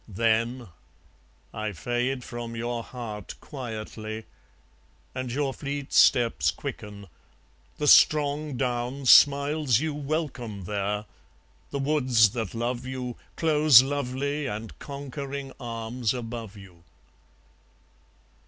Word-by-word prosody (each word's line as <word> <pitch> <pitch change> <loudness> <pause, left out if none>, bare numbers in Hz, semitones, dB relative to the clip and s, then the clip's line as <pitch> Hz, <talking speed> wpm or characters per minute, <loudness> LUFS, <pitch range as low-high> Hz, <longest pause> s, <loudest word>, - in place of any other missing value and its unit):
Then 115 +2 0 0.8
I 110 -1 -3
fade 120 +7 -2
from 120 -1 -6
your 120 +1 -3
heart, 115 -4 -7
quietly; 110 -4 -7 0.9
And 130 -1 -4
your 135 +1 -1
fleet 140 0 -5
steps 120 -1 +4
quicken. 100 -1 -6 0.7
The 150 - -2
strong 150 -1 +4
down 125 +1 -2
Smiles 140 -1 +5
you 155 0 -2
welcome 140 - -3
there; 105 +2 -2 0.6
the 140 - -3
woods 130 -7 +3
that 115 -3 -4
love 120 +2 -2
you 130 -2 -5 0.2
Close 150 -5 +6
lovely 140 +1 -2
and 110 -1 -6
conquering 140 -1 -6
arms 115 0 -3
above 115 -3 -6
you. 90 -4 -15
125 Hz, 100 wpm, -26 LUFS, 115-140 Hz, 0.9 s, Close